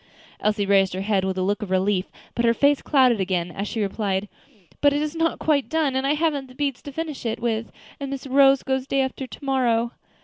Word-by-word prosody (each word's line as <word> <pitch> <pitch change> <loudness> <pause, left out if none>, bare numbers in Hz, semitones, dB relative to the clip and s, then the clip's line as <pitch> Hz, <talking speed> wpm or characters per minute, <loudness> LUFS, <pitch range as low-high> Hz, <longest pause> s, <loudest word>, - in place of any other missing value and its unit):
Elsie 210 -1 +1
raised 195 -2 +3
her 190 - -3
head 195 -1 +1
with 190 0 -2
a 185 - 0
look 205 +2 0
of 210 - -5
relief, 190 0 +1 0.2
but 235 - -1
her 230 0 +3
face 285 +2 +3
clouded 255 -6 +3
again, 180 -2 -1
as 200 +3 -4
she 220 0 -2
replied, 200 0 -1 0.5
"But 285 -1 +5
it 290 - 0
is 305 +1 -4
not 330 0 +1
quite 290 -4 +1
done, 310 -4 +1
and 265 +1 0
I 290 - +2
haven't 295 -4 0
the 255 - -16
beads 280 -2 -2
to 285 - -8
finish 310 0 -5
it 230 -1 -2
with, 230 -1 -2 0.3
and 280 -1 -4
Miss 275 0 -5
Rose 275 0 +5
goes 265 0 -1
day 275 0 +1
after 265 0 -3
to 280 - -11
morrow." 240 -3 +1
255 Hz, 235 wpm, -23 LUFS, 205-280 Hz, 0.5 s, But